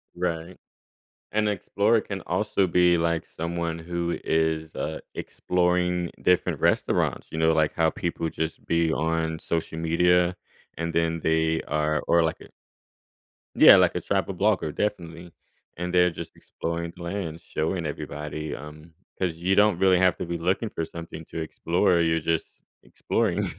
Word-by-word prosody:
Right, 85 0 -3 0.7
an 105 0 +1
explorer 105 +2 +1
can 100 -3 -6
also 95 +1 +1
be, 90 0 +4
like, 85 0 0
someone 85 0 -4
who 85 +1 -3
is, 80 0 0
uh, 80 +1 -3 0.2
exploring 90 -1 0
different 90 -2 +2
restaurants, - - +1
you 80 - -5
know, 80 0 +3
like 80 -1 +2
how 80 -1 +2
people 85 -1 -3
just 80 0 -4
be 85 -1 +1
on 80 0 -1
social 80 -1 -3
media 90 +2 +3 0.4
and 85 +1 -2
then 85 0 +1
they 80 0 +1
are 75 0 0
or 85 -1 +4
like 80 - -2
a - - -13 1.1
Yeah, - - +9
like - - +4
a - - -1
travel - - -1
blogger, 75 - +1
definitely, 85 -4 -4 0.4
and 90 +1 -4
they're 90 0 +5
just 85 - -8
exploring 85 0 -5
the 85 - -10
land, 85 -3 -4
showing 80 +2 -2
everybody, 75 +1 -5
um, 75 +2 -11 0.3
'cause 90 -4 -1
you 95 +3 +1
don't 105 -3 +4
really 95 -1 +4
have 95 -2 +4
to - - -4
be 85 0 -3
looking 95 +6 0
for 80 - -3
something 85 -1 -9
to 80 - -6
explore, 85 +3 +1
you're 80 0 +2
just 80 0 -2 0.2
exploring. - - -1
85 Hz, 155 wpm, -25 LUFS, 80-90 Hz, 1.1 s, Yeah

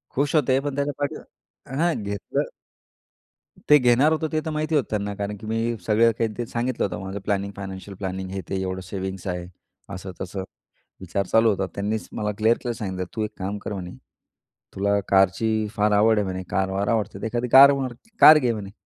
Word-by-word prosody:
खुश 145 +3 +1
होते. 135 -3 +3
पण 145 -1 -3
त्याच्या 140 +1 -1
पाठीवर 145 -1 -7
हां 170 +1 +3
घेतलं. 100 0 -3 1.2
ते 150 - +9
घेणार 125 +3 +4
होतो, 160 0 -1
ते 155 - +1
तर - - -2
माहिती 155 +1 -1
होतं 145 - +2
त्यांना. 100 -1 -2
कारण 100 +1 -4
की 110 - -11
मी 115 +1 -1
सगळं 115 +3 +4
काही 115 - +1
ते 120 - -2
सांगितलं 120 +2 -1
होतं, - - -4
माझं 95 +1 -5
प्लॅनिंग, 100 -1 -1
फायनान्शियल 95 0 -7
प्लॅनिंग 95 -1 -4
हे 95 - -4
ते 95 -1 -1
एवढं 95 0 -3
सेव्हिंग्स 95 -1 -5
आहे. 90 -1 -3 0.5
असं-तसं, 95 0 -6 0.6
विचार 95 +2 -2
चालू 115 +3 +4
होता. 95 -2 0
त्यांनीच 105 +2 -2
मला 105 -1 -2
क्लिअर 110 +2 +3
केलं 120 - -2
सांगितलं, 95 -4 -4
"तू 110 - -1
एक 105 - -3
काम 100 +2 -3
कर 105 - -6
म्हणे, 90 -3 -6 0.8
तुला 100 +1 +1
कारची 105 +3 +2
फार 105 0 +2
आवड 105 +2 +4
आहे 105 - 0
म्हणे, 95 0 -4
कार-वार 95 +1 -1
आवडते, 110 -4 -1
तर - - -3
एखादी 120 +2 -1
कार 140 +3 +9
मार 135 -3 -2 0.3
कार 155 0 +10
घे 125 -4 +1
म्हणे." 100 -3 -6
105 Hz, 195 wpm, -24 LUFS, 95-120 Hz, 1.2 s, कार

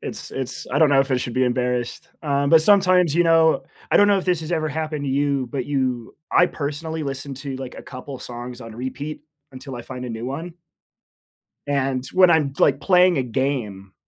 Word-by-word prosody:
It's - - -7
it's 130 -1 -5
I 145 - +2
don't 155 - +5
know 140 -1 +5
if 135 0 -1
I 130 - +3
should 120 -1 -4
be 130 - +2
embarrassed, 125 -1 -2
um, 140 -2 0
but 160 +1 +6
sometimes, 185 -4 +4
you 175 - +4
know, 165 -1 +4 0.3
I - - +5
don't 205 - +6
know 200 - +4
if 190 - -2
this 180 -3 +1
has 160 +1 -7
ever 160 -2 0
happened 155 -1 -3
to 135 - -2
you, 140 -1 0
but 130 -3 -3
you 130 -5 -2 0.2
I 175 - +5
personally 160 +1 -4
listen 135 -1 -5
to, 135 0 -6
like, 130 -1 -7
a - - -9
couple 130 +1 -9
songs 120 +1 -8
on 115 -1 -10
repeat 145 +5 -6 0.3
until 130 0 -8
I 120 - -7
find 125 +1 -7
a 125 - -5
new 115 0 -5
one 160 +7 -5 1.1
and 135 -2 -1
when 185 -1 +6
I'm, 150 -5 +2
like, 140 - +3
playing 180 0 +4
a - - +2
game, 120 -7 -3
140 Hz, 215 wpm, -22 LUFS, 130-160 Hz, 1.1 s, but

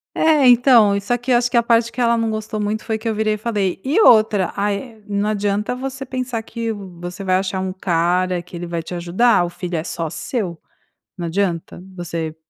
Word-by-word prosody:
É, 310 -3 +4
então 240 -4 +6
e - - -1
só 225 +5 0
que, 245 +2 -5
eu 245 - +5
acho 240 0 +1
que 240 - -1
a 235 - +5
parte 230 0 +2
que - - -5
ela 235 -1 +3
não 230 -1 0
gostou 215 0 -4
muito, 210 +1 -2
foi 220 -1 -2
que, 225 +1 -4
eu 220 - 0
virei 215 0 +1
e - - -3
falei: 205 -4 -2
"E 290 +11 +2
outra 215 - +5
aí 210 +3 -3
não 205 0 -1
adianta 205 +2 -1
você 270 +1 -5
pensar 255 -3 -3
que, 230 0 -4
você 180 -2 -8
vai 185 -1 +2
achar 190 0 -1
um 190 0 -3
cara 180 0 0
que 180 0 -11
ele 175 +1 -5
vai 170 -1 -3
te 165 - -9
ajudar, 180 +4 +2
o - - -2
filho 175 0 -5
é 160 - -3
só 165 -2 -4
seu, 190 - -4 0.6
não 175 -2 -3
adianta 175 -1 -2
você, 165 -3 -4
205 Hz, 225 wpm, -20 LUFS, 180-235 Hz, 0.6 s, então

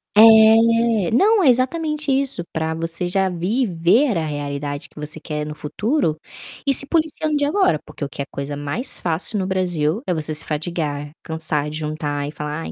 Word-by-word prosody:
É. 225 -1 +6
não, 410 - +4
é 330 - +3
exatamente 300 +4 +1
isso, 270 -8 0
para 160 0 -2
você 165 +2 -3
já 190 +1 +1
viver 185 - +1
a 160 - -1
realidade 145 -1 -4
que - - -14
você 150 +1 -6
quer 150 -2 -4
no 150 0 -6
futuro, 185 - -1 0.5
e - - +5
ir - - +2
se 275 - +1
policiando 310 -1 0
desde 290 - +1
agora 295 - +2
porque - - -8
o 140 - -3
que 140 - -6
é - - -3
coisa 140 +1 -5
mais 145 - -4
fácil 175 +5 +1
no 185 - -2
Brasil 180 0 0
é - - 0
você 155 -1 -3
se 155 - 0
fatigar, 150 -2 -3
cansar 155 -2 -1
de 155 - -5
juntar 150 -2 -3
e - - -5
falar: 150 +1 -5
"Ai, - - -6
170 Hz, 195 wpm, -21 LUFS, 150-235 Hz, 0.5 s, É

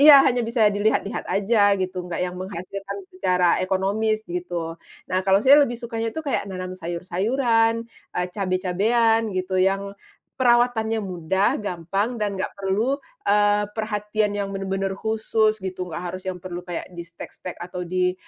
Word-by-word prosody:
Iya, 295 0 +10
hanya 245 -1 +3
bisa 230 -1 +1
dilihat-lihat 205 0 0
aja 205 +3 +2 0.2
gitu, 185 0 -2
enggak 175 - -4
yang 180 0 -4
menghasilkan 195 - -6
secara 180 - +2 0.2
ekonomis, 200 +4 +1 0.2
gitu. 180 0 -5 0.6
Nah 185 - +2
kalau 195 0 +6
saya 275 +2 +9
lebih 240 -3 -1
sukanya 230 -1 -2
itu 320 - -2
kayak 275 - 0
menanam 185 -1 -5
sayur-sayuran, 225 +7 +1 0.4
eee, 180 - +1
cabe-cabean, 210 +4 +2
gitu 185 +1 -2
yang 195 +1 +1 0.5
perawatannya 240 -2 +3
mudah, 190 +2 +1
gampang, 195 +5 -2
dan 205 -1 0
enggak - - -1
perlu, 205 +8 +1 0.3
eee, 205 0 +4
perhatian 210 -1 -1
yang 200 -1 -1
benar-benar 195 0 -2
khusus 220 0 +1
gitu, 185 -1 -4
enggak 170 +1 -5
harus 185 - -11
yang 185 -1 -3
perlu 175 -1 -5
kayak 175 -2 -5
di-stek-stek 170 +1 -8
atau 180 +1 -5
di, 180 +1 +1
200 Hz, 150 wpm, -24 LUFS, 185-220 Hz, 0.6 s, Iya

